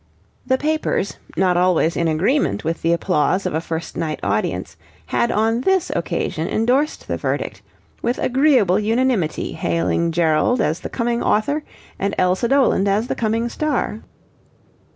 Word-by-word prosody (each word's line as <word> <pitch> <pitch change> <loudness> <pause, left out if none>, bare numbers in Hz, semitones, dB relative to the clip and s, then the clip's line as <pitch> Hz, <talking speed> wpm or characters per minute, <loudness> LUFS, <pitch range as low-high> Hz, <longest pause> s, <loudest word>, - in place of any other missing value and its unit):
The 260 - +3
papers, 310 -8 -1 0.2
not 180 -1 +3
always 175 -2 +2
in 170 - +1
agreement 165 - +1
with 165 +1 -2
the 165 - +1
applause 180 +2 +1
of - - -1
a 160 - 0
first 165 0 -5
night 155 -2 -3
audience, 90 -4 -1 0.3
had 120 +6 0
on 225 +3 +1
this 380 +4 +1
occasion 165 -1 -2
endorsed 255 +9 0
the - - -2
verdict, - - -3 0.4
with 240 +1 0
agreeable 255 - +3
unanimity 225 -5 0
hailing 165 +1 0
Gerald 165 +8 +2
as 160 -5 0
the - - -6
coming 235 -1 -1
author 285 +8 +1 0.4
and 200 +1 -1
Elsa 185 +5 +2
Doland 260 -7 +3
as 210 +5 +1
the - - +1
coming 225 +1 0
star. 280 -4 -2
200 Hz, 150 wpm, -20 LUFS, 165-245 Hz, 0.4 s, The